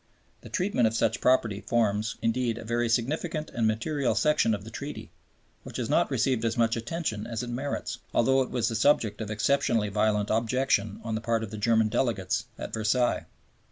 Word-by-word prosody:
The - - -11
treatment 180 - +1
of 110 - -2
such 115 +1 +1
property 115 -5 +2
forms, 110 -2 0
indeed, 115 0 0
a 115 - -8
very 120 +1 0
significant 150 +7 -1
and 115 -2 +1
material 120 +3 0
section 120 -2 +3
of 100 - -8
the 110 - -10
Treaty, 145 +5 -7 0.5
which - - -8
has - - -2
not - - +3
received 125 -4 +1
as 115 0 0
much 115 0 +2
attention 115 -3 -3
as 115 0 -3
it 120 - -5
merits, 125 -2 -3
although 135 +3 +3
it 130 - -2
was 120 -3 0
the 115 - -2
subject 110 -4 +2
of 105 - -4
exceptionally 110 0 +1
violent 105 0 +1
objection 110 -2 +1
on 115 -1 -3
the 110 - -2
part 115 -1 0
of 105 - -6
the - - -5
German 110 0 +3
delegates 110 -2 0
at - - -7
Versailles. 115 +3 +1
115 Hz, 190 wpm, -27 LUFS, 110-125 Hz, 0.5 s, section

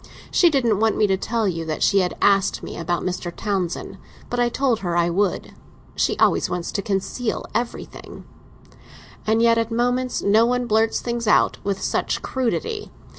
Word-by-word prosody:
"She 350 - +5
didn't 240 -9 +1
want 220 0 +2
me 215 - +4
to 195 -2 +2
tell 220 +3 -1
you 165 -3 -2
that 155 -1 -2
she 200 - +4
had 180 -1 -1
asked 195 -1 +3
me - - -7
about 175 +1 -2
Mr. 180 -1 -3
Townsend; 190 -3 -3 0.3
but 245 - -1
I 240 0 +3
told 250 -2 0
her 175 -4 -2
I 170 0 +2
would. 195 +2 -1 0.4
She - - 0
always - - +2
wants 175 -1 -3
to 200 - -2
conceal 205 +4 -2
everything." 240 0 -5 1.0
"And 225 +1 +3
yet 230 0 +4
at 230 -1 -1
moments 245 +2 0
no 210 +3 +4
one 250 0 0
blurts 220 0 +1
things 235 -1 -3
out 210 - +3
with 200 -1 -2
such - - -1
crudity. 420 - -2
220 Hz, 175 wpm, -22 LUFS, 190-240 Hz, 1.0 s, She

